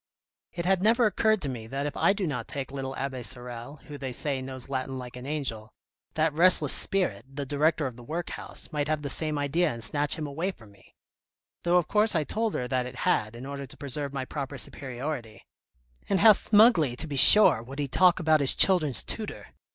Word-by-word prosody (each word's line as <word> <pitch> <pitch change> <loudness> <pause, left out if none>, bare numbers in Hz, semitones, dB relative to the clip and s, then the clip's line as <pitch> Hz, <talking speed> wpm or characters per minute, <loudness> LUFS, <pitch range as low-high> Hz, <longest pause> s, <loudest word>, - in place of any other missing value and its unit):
" - - -68
It 170 - -5
had 190 0 +1
never 230 +4 +2
occurred 215 -1 0
to - - -3
me 115 -4 -8
that 135 +4 -5
if 145 - -5
I - - +2
do 200 -1 -3
not 125 -8 -5
take 135 -2 -7
little 135 -1 -6
Abbe 135 -2 -5
Sorel, 120 +2 -7
who, 145 -1 -10
they 130 -1 -6
say, 135 +2 -2
knows 130 -1 -7
Latin 135 -1 -5
like 125 -1 -9
an 125 +1 -10
angel, 130 -8 -5 0.5
that 155 -1 0
restless 180 +4 +4
spirit, 180 - 0
the 140 +1 -6
director 150 +3 0
of 125 -3 -6
the 120 - -13
workhouse, 165 +6 -6
might 150 -2 -3
have 155 -1 -3
the 140 - -4
same 155 -2 -2
idea 150 +4 -1
and 115 -1 -7
snatch 145 +7 +2
him 155 - -6
away 155 +6 -4
from 110 - -12
me, 100 - -24 0.7
though 175 +1 +1
of 175 -3 0
course 215 -1 +2
I 160 - +1
told 220 +7 -3
her 125 - -3
that 125 0 -2
it 125 - -11
had, 110 +2 0
in 120 +3 -10
order 140 0 -7
to - - -15
preserve 140 0 -4
my 135 -2 -5
proper 140 0 -7
superiority. 130 -5 -7 0.6
And 195 -3 0
how 220 - +8
smugly, 205 - +3
to 145 - -6
be 150 -3 -6
sure, 175 - +10
would 130 +4 -11
he 145 -1 -3
talk 180 +7 +3
about 155 -3 +2
his 135 - +6
children's 155 - +3
tutor 220 -2 -6
140 Hz, 220 wpm, -26 LUFS, 130-170 Hz, 0.7 s, sure